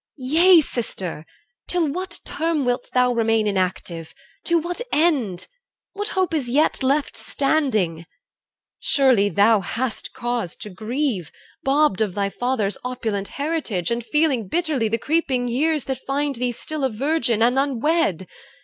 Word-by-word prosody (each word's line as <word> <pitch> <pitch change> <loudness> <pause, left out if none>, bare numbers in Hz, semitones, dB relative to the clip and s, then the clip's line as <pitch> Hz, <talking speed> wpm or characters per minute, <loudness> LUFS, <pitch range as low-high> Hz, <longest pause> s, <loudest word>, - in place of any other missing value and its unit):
Yea, 325 +7 +5
sister! 195 - -4 0.4
Till 350 -3 +1
what 355 +4 -4
term 320 -3 -1
wilt 245 0 -1
thou 250 -1 +3
remain 225 -2 +2
Inactive? 180 -4 -2 0.3
To 340 - +3
what 345 +6 -3
end? 270 - +1 0.5
What 410 +1 -3
hope 370 -2 +1
is 280 -6 -1
yet 285 +4 +2
Left 275 +2 +1
standing? 220 - 0 0.7
Surely 255 -8 +3
thou 205 +4 +4
hast 230 +5 -3
cause 240 -7 -3
to 210 - -7
grieve, 220 - -2 0.3
Bobbed 275 -7 +2
of 205 -4 0
thy 200 -1 -1
father's 245 -5 -1
opulent 220 -6 -3
heritage, 280 - -2
And 235 0 -1
feeling 280 -5 +1
bitterly 305 - 0
the 225 +2 0
creeping 265 -2 0
years 295 +4 +1
That 265 -2 -4
find 280 +1 0
thee 245 +1 -1
still 300 +5 -4
a 265 - +2
virgin 240 -2 +1
and 245 +3 +3
unwed. 275 - +1
250 Hz, 140 wpm, -22 LUFS, 215-300 Hz, 0.7 s, Yea